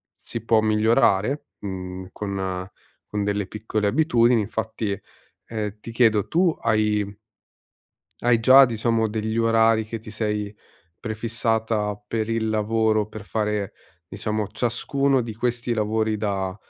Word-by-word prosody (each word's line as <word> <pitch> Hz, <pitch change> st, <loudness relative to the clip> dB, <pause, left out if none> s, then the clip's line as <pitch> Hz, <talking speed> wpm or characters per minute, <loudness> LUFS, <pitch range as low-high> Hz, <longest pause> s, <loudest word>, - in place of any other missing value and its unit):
si 115 Hz, -1 st, -7 dB
può 115 Hz, -1 st, +4 dB
migliorare, 110 Hz, +3 st, +2 dB
mhmm, 95 Hz, -1 st, -6 dB
con 95 Hz, -2 st, -4 dB, 0.4 s
con 105 Hz, -1 st, -2 dB
delle 100 Hz, -1 st, -1 dB
piccole 110 Hz, -1 st, -2 dB
abitudini, 120 Hz, -2 st, +3 dB
infatti, 110 Hz, -1 st, -3 dB, 0.5 s
ehm, 105 Hz, -2 st, -4 dB
ti 115 Hz, -, -8 dB
chiedo 110 Hz, -3 st, +3 dB
tu 170 Hz, -1 st, +2 dB
hai 105 Hz, -2 st, +2 dB, 1.2 s
hai 120 Hz, -1 st, +3 dB
già, 130 Hz, +3 st, +8 dB
diciamo 115 Hz, -2 st, 0 dB
degli 110 Hz, +1 st, -2 dB
orari 115 Hz, -1 st, +3 dB
che 115 Hz, +1 st, -5 dB
ti 110 Hz, 0 st, -11 dB
sei 105 Hz, -2 st, -2 dB, 0.5 s
prefissata 110 Hz, -2 st, -1 dB
per 110 Hz, 0 st, -2 dB
il 115 Hz, -1 st, 0 dB
lavoro, 110 Hz, 0 st, +1 dB
per 110 Hz, -2 st, -9 dB
fare, 105 Hz, -2 st, -2 dB, 0.4 s
diciamo 105 Hz, +1 st, -2 dB
ciascuno 130 Hz, +5 st, 0 dB
di 115 Hz, -2 st, -5 dB
questi 120 Hz, +1 st, -1 dB
lavori 110 Hz, 0 st, 0 dB
da, 100 Hz, -3 st, -2 dB
110 Hz, 125 wpm, -24 LUFS, 105-115 Hz, 1.2 s, già